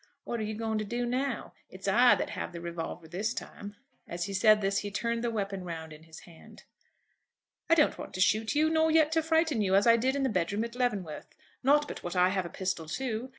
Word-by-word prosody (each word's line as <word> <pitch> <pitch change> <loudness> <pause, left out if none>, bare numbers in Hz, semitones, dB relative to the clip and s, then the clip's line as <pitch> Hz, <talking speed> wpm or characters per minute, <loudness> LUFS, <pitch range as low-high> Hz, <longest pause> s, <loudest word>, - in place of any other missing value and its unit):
"What 235 - -4
are - - -2
you 215 0 -4
going 220 0 -2
to - - -2
do 240 +3 -2
now? 255 +1 -2 0.2
It's 190 +1 -9
I 240 +6 +6
that - - -3
have - - -5
the 170 - -6
revolver 170 -1 -6
this 205 +8 -3
time." 205 0 -8 0.3
As 170 0 -4
he 200 - -4
said 215 +2 +5
this 195 0 0
he 205 - -5
turned 230 +3 -2
the 240 - 0
weapon 200 -4 -3
round 160 -2 -7
in 155 +1 -14
his 160 -1 -12
hand. 170 -2 -16 1.1
"I 330 - +6
don't 300 -3 +3
want - - -8
to - - -5
shoot 220 +6 +2
you, 305 +1 +4
nor 320 0 +3
yet 315 -1 +4
to 320 0 +2
frighten 320 -6 +1
you, 190 -2 +2
as 200 - +4
I 230 0 +6
did 260 +4 0
in 280 - 0
the - - +2
bed 180 -5 0
room 210 +2 -1
at 235 0 -6
Leavenworth. 210 -11 -2 0.3
Not 290 +3 +3
but - - -7
what 175 +1 -5
I 180 0 +4
have 190 -2 -1
a - - -10
pistol 185 -4 -3
too." 245 +5 -3
215 Hz, 245 wpm, -29 LUFS, 185-250 Hz, 1.1 s, I